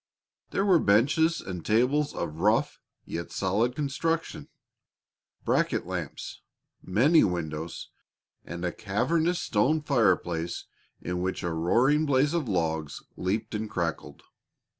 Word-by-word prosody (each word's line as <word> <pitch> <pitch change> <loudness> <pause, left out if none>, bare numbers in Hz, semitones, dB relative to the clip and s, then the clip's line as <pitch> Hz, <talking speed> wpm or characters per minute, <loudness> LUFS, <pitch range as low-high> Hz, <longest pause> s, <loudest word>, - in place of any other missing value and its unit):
There 195 - 0
were 185 -4 +5
benches 150 +10 +3
and 90 -3 -6
tables 130 +7 +2
of 80 -2 -4
rough - - +2 0.3
yet 85 +1 -5
solid 105 +6 0
construction, 155 +3 -2 1.0
bracket - - +1
lamps, - - -6 0.4
many 130 - +4
windows, 85 -2 -3 0.5
and 85 +2 -6
a 90 - 0
cavernous 160 - 0
stone 130 +8 +1
fireplace 90 - +1 0.4
in 90 0 -3
which 95 +1 -2
a 85 - -1
roaring 125 - +2
blaze 140 +2 +2
of 160 -8 -1
logs 80 -5 -2
leaped 105 +5 -2
and 110 0 -3
crackled. 85 -4 -4
105 Hz, 120 wpm, -27 LUFS, 85-145 Hz, 1.0 s, were